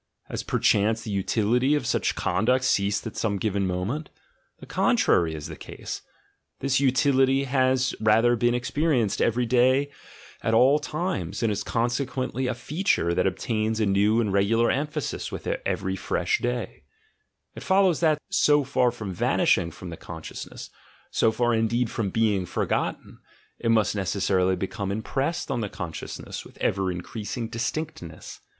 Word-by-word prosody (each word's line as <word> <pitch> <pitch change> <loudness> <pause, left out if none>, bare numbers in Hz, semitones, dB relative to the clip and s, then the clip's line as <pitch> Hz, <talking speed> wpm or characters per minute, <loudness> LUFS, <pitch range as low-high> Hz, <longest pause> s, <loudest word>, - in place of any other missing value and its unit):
Has - - -2
perchance 110 +2 +2
the 110 - -5
utility 115 +7 +2
of 145 - -1
such 120 - 0
conduct 120 +8 +1
ceased 100 -2 +1
at 115 - -6
some 105 -3 -1
given 100 -1 0
moment? 100 - -3 0.5
The - - -12
contrary 80 -2 +2
is 75 - -7
the - - -7
case. - - -7 0.6
This 135 0 +1
utility 135 0 +3
has 130 -1 +1
rather 110 +3 +4
been 120 +1 +2
experi 135 +4 +1
enced 105 -4 0
every 120 +2 +2
day 130 +4 +3 0.5
at 115 - +1
all 135 +6 +5
times, 150 - -3
and 115 - +2
is 105 - -2
consequently 125 +2 -1
a 125 - -1
feature 145 - 0
that 85 - +2
obtains 110 +3 -1
a 110 - +2
new 100 +3 +3
and 105 -4 0
regular 110 +4 +3
emphasis 150 +2 -3
with - - -6 0.2
every - - -1
fresh 425 -1 0
day; - - -3 0.7
it - - -9
follows 190 -3 +3
that, 155 -3 +3
so 150 -6 +4
far 125 -2 +2
from 110 -5 -6
vanishing 85 -1 +2
from 85 +2 -9
the 80 - -7
consciousness, 80 -2 -8 0.4
so 115 - +3
far 120 +1 +1
indeed 115 +1 +1
from 110 -4 -1
being 105 -3 +1
forgotten, - - -2 0.4
it 115 - -1
must 110 -2 +3
necessarily 95 -1 +1
become 95 +1 -3
impressed 135 - -2
on 120 -3 -1
the 105 - -3
consciousness 80 -4 -6
with - - -16
ever 95 -1 0
increasing 110 +6 -5
distinctness. 115 - -5
115 Hz, 155 wpm, -25 LUFS, 100-130 Hz, 0.7 s, all